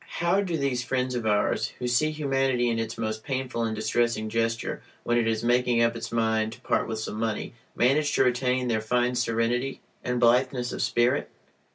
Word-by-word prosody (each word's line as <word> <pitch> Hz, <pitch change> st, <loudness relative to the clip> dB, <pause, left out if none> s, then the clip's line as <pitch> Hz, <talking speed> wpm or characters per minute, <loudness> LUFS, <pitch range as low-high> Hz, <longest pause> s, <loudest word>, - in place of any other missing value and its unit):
How 175 Hz, +4 st, +3 dB
do 175 Hz, -5 st, -2 dB
these 135 Hz, -4 st, -1 dB
friends 125 Hz, +1 st, -1 dB
of 120 Hz, -3 st, -2 dB
ours, 105 Hz, -1 st, +1 dB
who 125 Hz, -, -3 dB
see 125 Hz, +6 st, +2 dB
humanity 135 Hz, -5 st, +1 dB
in 115 Hz, -, -1 dB
its 115 Hz, 0 st, -4 dB
most 110 Hz, -1 st, -3 dB
painful 130 Hz, -3 st, -3 dB
and 110 Hz, -1 st, -1 dB
distressing 110 Hz, 0 st, 0 dB
gesture 115 Hz, +1 st, -1 dB
(i.e., -, -, -26 dB
when 120 Hz, -, +1 dB
it 115 Hz, -, +1 dB
is 110 Hz, 0 st, 0 dB
making 120 Hz, 0 st, +3 dB
up 115 Hz, 0 st, +2 dB
its -, -, -6 dB
mind 110 Hz, -1 st, +1 dB
to -, -, -15 dB
part -, -, 0 dB
with 110 Hz, -, -3 dB
some 110 Hz, 0 st, -4 dB
money), 110 Hz, -1 st, -2 dB, 0.2 s
manage 145 Hz, +4 st, +2 dB
to -, -, +4 dB
retain 125 Hz, 0 st, +1 dB
their 110 Hz, -2 st, 0 dB
fine 125 Hz, +3 st, +1 dB
serenity 120 Hz, +2 st, 0 dB, 0.2 s
and 125 Hz, 0 st, -1 dB
blitheness 125 Hz, +1 st, +2 dB
of -, -, -4 dB
spirit? 120 Hz, +4 st, +1 dB
120 Hz, 200 wpm, -26 LUFS, 115-130 Hz, 0.2 s, to